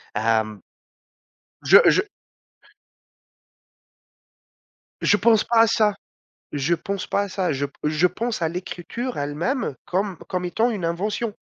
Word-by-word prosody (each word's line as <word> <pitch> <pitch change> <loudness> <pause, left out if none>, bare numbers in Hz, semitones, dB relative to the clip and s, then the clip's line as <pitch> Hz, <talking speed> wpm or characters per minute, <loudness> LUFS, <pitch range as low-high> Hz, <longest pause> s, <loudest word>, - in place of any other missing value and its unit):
Hem, 110 -2 0 1.1
je - - +10
je - - +1 2.9
je 205 - +4
pense 220 0 +4
pas 235 -1 +2
à 230 - +5
ça, 215 -2 +2 0.6
je 145 +4 +1
pense 195 +3 -4
pas 200 - 0
à 200 - -4
ça. 185 -4 -1
Je 140 +1 -1
p 140 - -22
je 155 +4 +3
pense 225 0 -3
à 160 - +2
l'écriture 180 +8 -5
elle 145 0 -3
même, 245 - -1
comme 190 +1 -1
comme 180 -1 -2
étant 225 +7 +1
une 200 -7 -4
invention. 205 +6 -2
180 Hz, 135 wpm, -23 LUFS, 155-215 Hz, 2.9 s, je